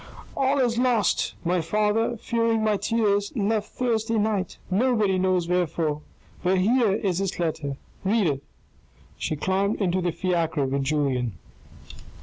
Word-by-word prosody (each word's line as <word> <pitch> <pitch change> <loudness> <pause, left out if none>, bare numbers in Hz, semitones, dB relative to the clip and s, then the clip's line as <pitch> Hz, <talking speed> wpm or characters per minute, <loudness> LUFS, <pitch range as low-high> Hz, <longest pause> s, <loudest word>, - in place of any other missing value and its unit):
" - - -17
All 275 +1 +2
is 240 -3 +1
lost. 245 -6 +1
My 175 +1 +2
father, 215 +6 +1
fearing 230 0 0
my 215 -1 +2
tears, 205 -2 +1
left 215 -1 0
Thursday 225 -2 0
night. 210 -3 -1
Nobody 210 -3 +2
knows 185 -2 +1
where 180 0 +2
for? 150 -1 -2 0.4
But 185 +1 +2
here 220 +2 +3
is 195 -3 0
his 195 -1 -2
letter: 155 -5 -2 0.3
read 205 +1 +2
it." 140 -3 -1 0.8
She 155 - -1
climbed 190 +6 0
into 185 -2 +1
the 175 -1 0
fiacre 165 -5 0
with 135 +1 -1
Julien. 135 -6 0
195 Hz, 145 wpm, -25 LUFS, 170-225 Hz, 0.8 s, here